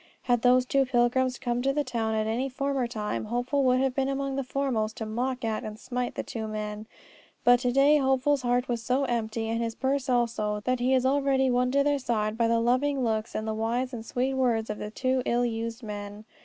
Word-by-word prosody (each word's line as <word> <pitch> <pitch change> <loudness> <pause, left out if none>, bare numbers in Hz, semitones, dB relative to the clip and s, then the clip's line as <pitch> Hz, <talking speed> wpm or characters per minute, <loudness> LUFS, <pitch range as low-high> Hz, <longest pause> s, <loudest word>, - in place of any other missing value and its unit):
Had 245 -2 +2
those 250 +1 +4
two 275 +1 +2
pilgrims 250 +1 +2
come 245 -2 -2
to 270 +2 +1
the 295 +1 0
town 225 -4 -2
at 215 0 0
any 240 +5 -1
former 275 -1 -1
time, 215 -2 -3
Hopeful 245 +5 0
would 255 0 +4
have 265 -1 +1
been 270 0 0
among 275 0 -2
the 275 - -1
foremost 250 -5 -1
to 220 - -4
mock 245 +3 -2
at 220 -1 -2
and 215 0 -6
smite 250 0 -4
the - - -3
two 220 -2 -5
men; 215 0 -5 0.6
but, 245 0 +6
to 250 0 0
day, 280 +4 +5
Hopeful's 270 +1 +2
heart 245 +1 +1
is 235 -2 -2
so 255 +4 +1
empty, 225 -3 -2
and 230 +1 -1
his 230 -1 -2
purse 270 +1 -1
also, 230 -4 0
that 255 0 +1
he 255 +2 +2
is 260 0 +1
already 270 -1 +2
won 250 +1 +2
to 280 +2 +3
their 290 0 +1
side 215 -4 -1
by 230 0 +2
the 230 0 +2
loving 255 +4 +1
looks 220 -1 -1
and 215 - -2
the 220 - -1
wise 235 +4 -1
and 230 -2 -5
sweet 250 +3 -1
words 235 -4 +1
of 210 - -6
the 210 - -5
two 255 +3 0
ill 240 +1 +2
used 230 +1 -4
men. 205 0 -7
245 Hz, 230 wpm, -27 LUFS, 225-265 Hz, 0.6 s, but